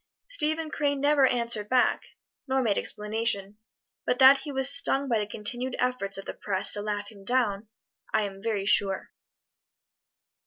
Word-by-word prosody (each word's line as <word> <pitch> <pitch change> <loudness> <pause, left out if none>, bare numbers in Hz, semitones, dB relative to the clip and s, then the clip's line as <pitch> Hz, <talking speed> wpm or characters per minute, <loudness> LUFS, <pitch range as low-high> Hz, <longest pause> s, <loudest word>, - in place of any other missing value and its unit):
Stephen 315 -9 -1
Crane 285 -2 -1
never 285 -1 +3
answered 235 -4 -1
back, 255 -1 +1 0.4
nor 265 0 0
made 210 -4 0
explanation, 210 -1 -3 0.4
but 250 - -1
that 265 +1 +7
he 290 +2 -8
was 265 -1 +4
stung 280 -2 +4
by 230 -4 0
the 210 - -3
continued 240 +5 -3
efforts 250 -6 -1
of 195 - -7
the - - -6
press 190 -2 0
to 205 - +5
laugh 205 0 -4
him 200 -2 -16
down, 220 -3 -1 0.4
I 215 - +1
am 195 -1 -7
very 210 -3 -3
sure. 195 -1 0
230 Hz, 160 wpm, -26 LUFS, 205-265 Hz, 0.4 s, that